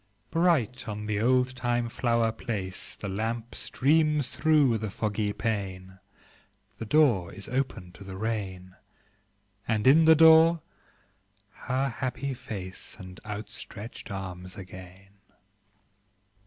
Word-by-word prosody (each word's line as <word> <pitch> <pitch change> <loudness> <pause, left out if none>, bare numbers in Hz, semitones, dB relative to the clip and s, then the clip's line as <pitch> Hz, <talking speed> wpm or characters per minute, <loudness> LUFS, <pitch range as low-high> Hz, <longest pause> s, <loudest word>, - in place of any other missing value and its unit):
Bright 130 - +1
on 105 0 -4
the 105 -1 -1
oldtime 125 0 +1
flower 115 -1 +1
place 100 -4 -5
The 100 - -6
lamp 115 +4 -3
streams 150 -1 +2
through 145 -7 +3
the 110 -1 -3
foggy 105 +1 -1
pane; 95 -3 -4 0.8
The 115 - -5
door 120 - +3
is 100 - -7
opened 125 -9 -3
to 100 - -12
the 95 -1 -8
rain: 95 -4 -4 0.9
And 110 -1 0
in 155 +5 +7
the 160 0 +8
door 160 +1 +7 0.9
her 135 +4 -2
happy 130 +2 -3
face 95 -6 -7
And 95 -2 -10
outstretched 105 +1 -7
arms 90 -2 -6
again. 95 +1 -12
110 Hz, 115 wpm, -28 LUFS, 95-130 Hz, 0.9 s, the